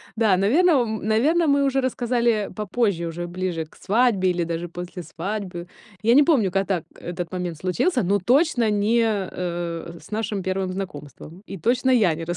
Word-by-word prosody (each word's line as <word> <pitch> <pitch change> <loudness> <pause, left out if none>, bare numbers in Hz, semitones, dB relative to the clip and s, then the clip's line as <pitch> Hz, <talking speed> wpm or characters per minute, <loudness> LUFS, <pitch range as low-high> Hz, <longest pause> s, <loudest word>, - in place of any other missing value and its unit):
Да, 215 -5 +3
наверно, 295 - +4
ом, 220 -2 -2
наверно, 305 +10 +3
мы 280 -1 +3
уже 270 -1 +1
рассказали, 240 -2 +1
э, 210 -2 -1
попозже, 205 -4 -1
уже 175 +1 -5
ближе 175 -2 -3
к - - -23
свадьбе 205 -3 +2
или 175 -1 0
даже 170 +1 -3
после 175 +1 -7
свадьбы. 180 +2 -5 0.4
Я 230 +2 +5
не 290 - +7
помню, 260 - +3
ка 195 +2 +1
так 185 -5 -1
когда 175 0 -5
момент 180 -3 -4
случился, 190 - 0
но 200 +3 +2
точно 245 - +2
не, 210 +3 +2
э, 210 -4 0
э, 170 -1 -4
э, - - -12
с - - -17
нашим 210 -2 -2
первым 190 0 -2
знакомством, 170 -2 -8
и 195 - -6
точно 245 - +1
я 215 -9 +4
не 165 +1 -6
195 Hz, 190 wpm, -23 LUFS, 175-235 Hz, 0.4 s, не